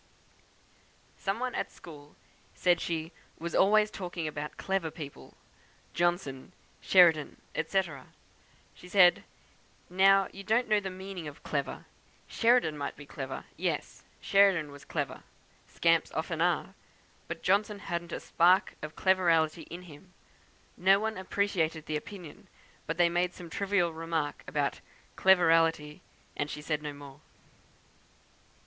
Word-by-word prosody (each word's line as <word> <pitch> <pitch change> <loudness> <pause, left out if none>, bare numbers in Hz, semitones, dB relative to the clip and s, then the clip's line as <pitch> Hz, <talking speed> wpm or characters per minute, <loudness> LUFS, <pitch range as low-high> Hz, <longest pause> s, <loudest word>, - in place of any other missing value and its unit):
"Some 195 +3 -2
one 255 -1 -2
at - - -3
school 150 -3 -13 0.4
said 175 -2 +2
she 165 -1 -3 0.3
'was 170 +1 -5
always 210 +2 +4
talking 175 -4 -5
about 150 0 -6
clever 190 -4 -1
people; 155 -3 -10 0.6
Johnson, 175 -4 -1 0.3
Sheridan, 165 -5 +4 0.2
&c.' 190 +4 +1 0.9
She 180 - -14
said, 180 -2 +5 0.7
'Now 195 +1 +5
you 195 - -8
don't 225 +5 +1
know 215 -1 +3
the 195 -1 -5
meaning 185 -3 -7
of 145 +1 -11
clever, - - -3 0.4
Sheridan 230 -11 +2
might 140 - -4
be 145 - -12
clever; 135 -2 -6
yes, - - -3 0.2
Sheridan 195 -7 +3
was 140 0 -13
clever, - - -3 0.5
scamps - - +2
often - - -2
are; - - +1 0.5
but - - -6
Johnson 205 +2 +2
hadn't 170 -3 -5
a - - -3
spark 180 +3 +3
of 150 0 -7
cleverality 165 -4 +2
in 175 +2 -8
him.' 180 +2 -15 0.6
No 195 +2 +5
one 220 +1 -2
appreciated 185 -5 -1
the 155 - -3
opinion; 170 +1 -8 0.4
they 170 +2 +3
made 175 +1 0
some 175 -2 -10
trivial 195 -4 +1
remark 160 -2 -3
about - - -1 0.4
'cleverality,' 165 -5 +3 0.3
and 145 - -2
she 150 - -6
said 150 -1 -1
no 150 -1 -4
more. 145 -1 -12
175 Hz, 130 wpm, -30 LUFS, 155-195 Hz, 0.9 s, said